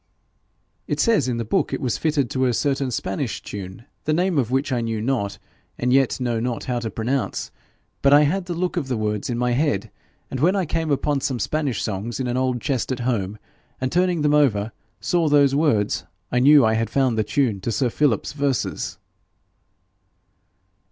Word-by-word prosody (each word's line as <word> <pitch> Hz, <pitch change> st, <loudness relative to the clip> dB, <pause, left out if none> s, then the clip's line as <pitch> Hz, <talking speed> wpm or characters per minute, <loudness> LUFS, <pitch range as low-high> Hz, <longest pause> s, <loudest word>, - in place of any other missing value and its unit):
'It -, -, -2 dB
says 220 Hz, -, +3 dB
in 125 Hz, -2 st, -1 dB
the 115 Hz, -, -2 dB
book 105 Hz, -, 0 dB
it -, -, -2 dB
was 130 Hz, -5 st, -1 dB
fitted 150 Hz, -5 st, +1 dB
to 130 Hz, +2 st, 0 dB
a 125 Hz, -2 st, +1 dB
certain 140 Hz, 0 st, 0 dB
Spanish 115 Hz, +1 st, -3 dB
tune, 95 Hz, +3 st, -8 dB, 0.2 s
the 155 Hz, -, +1 dB
name 175 Hz, -1 st, +2 dB
of 120 Hz, -4 st, 0 dB
which 135 Hz, +2 st, 0 dB
I 125 Hz, -2 st, +1 dB
knew 115 Hz, -1 st, -2 dB
not, 105 Hz, -4 st, -1 dB, 0.4 s
and 125 Hz, +1 st, +1 dB
yet 135 Hz, -1 st, +3 dB
know 120 Hz, -3 st, -1 dB
not 120 Hz, 0 st, -2 dB
how 125 Hz, -1 st, -1 dB
to 115 Hz, -1 st, -4 dB
pronounce; 120 Hz, +5 st, -2 dB, 0.5 s
but 140 Hz, -, +4 dB
I 145 Hz, +1 st, +7 dB
had 180 Hz, +6 st, 0 dB
the 175 Hz, -, -3 dB
look 180 Hz, +1 st, -2 dB
of 150 Hz, -6 st, -1 dB
the 125 Hz, -3 st, -1 dB
words 105 Hz, 0 st, -2 dB
in 120 Hz, -, -1 dB
my 125 Hz, 0 st, +1 dB
head, 120 Hz, -6 st, 0 dB, 0.4 s
and 130 Hz, -, -3 dB
when 175 Hz, +8 st, +3 dB
I 190 Hz, -3 st, +1 dB
came 160 Hz, 0 st, -2 dB
upon 145 Hz, 0 st, +1 dB
some 135 Hz, -2 st, -1 dB
Spanish 135 Hz, -1 st, -1 dB
songs 105 Hz, +4 st, -3 dB
in 130 Hz, -, -1 dB
an 120 Hz, 0 st, -1 dB
old 130 Hz, -2 st, 0 dB
chest 135 Hz, -3 st, -1 dB
at 125 Hz, -1 st, -2 dB
home, 105 Hz, -5 st, -1 dB, 0.4 s
and, 130 Hz, 0 st, -2 dB
turning 180 Hz, -3 st, +1 dB
them 150 Hz, 0 st, +3 dB
over, 115 Hz, -8 st, +3 dB, 0.3 s
saw 170 Hz, -3 st, +1 dB
those 140 Hz, -2 st, +4 dB
words, 140 Hz, -9 st, +1 dB, 0.3 s
I 125 Hz, -, +2 dB
knew 140 Hz, 0 st, +7 dB
I 110 Hz, -, +3 dB
had 115 Hz, 0 st, 0 dB
found 130 Hz, -4 st, +1 dB
the 110 Hz, -, +1 dB
tune 110 Hz, -4 st, 0 dB
to 115 Hz, -, -2 dB
sir 125 Hz, +1 st, 0 dB
Philip's 135 Hz, -2 st, +1 dB
verses.' 140 Hz, -4 st, -2 dB
130 Hz, 200 wpm, -23 LUFS, 115-145 Hz, 0.5 s, I